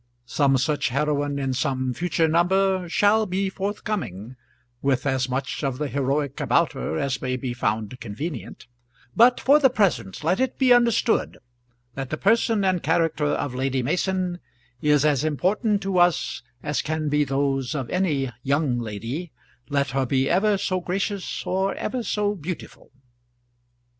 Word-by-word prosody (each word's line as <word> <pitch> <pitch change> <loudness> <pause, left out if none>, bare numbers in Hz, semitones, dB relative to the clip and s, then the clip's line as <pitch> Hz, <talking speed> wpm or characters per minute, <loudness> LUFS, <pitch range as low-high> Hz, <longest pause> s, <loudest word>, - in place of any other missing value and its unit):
Some 135 +2 +2
such 145 +1 0
heroine 145 +1 0
in 135 -2 -1
some 130 0 -1
future 175 +1 +1
number 185 +2 +2
shall 210 +4 +3
be 190 +1 -1
forthcoming, 190 - -4 0.5
with 135 -1 0
as 130 -2 0
much 135 +3 -3
of 135 -3 -1
the 150 - -2
heroic 140 0 -1
about - - +2
her 80 - -3
as 130 +3 -1
may 130 -1 -1
be 125 -1 -4
found 110 0 -2
convenient; 120 +7 -6 0.5
but 245 +2 +6
for 285 +4 +5
the 270 -3 +5
present 160 - 0
let 175 +5 +1
it 260 -1 0
be 255 -2 +5
understood 235 -1 +2 0.6
that 135 0 -5
the 155 - -3
person 220 0 +2
and 185 -2 +1
character 160 -1 +1
of 145 -2 -1
Lady 130 0 -1
Mason 180 +4 -1 0.4
is 150 -1 +3
as 145 -2 +2
important 195 - 0
to 195 -2 0
us 170 -7 +2 0.2
as 145 - -1
can 155 0 -2
be 150 0 +2
those 135 0 -1
of 135 -4 -3
any 150 -9 0
young 140 -2 +1
lady, 120 - -5 0.4
let 140 -1 0
her 135 0 0
be 135 +1 +1
ever 200 +5 +2
so 185 -1 -1
gracious 195 +2 -3
or 190 +1 0
ever 255 - -3
so 210 -2 0
beautiful. 175 -2 -7
150 Hz, 155 wpm, -24 LUFS, 135-190 Hz, 0.6 s, but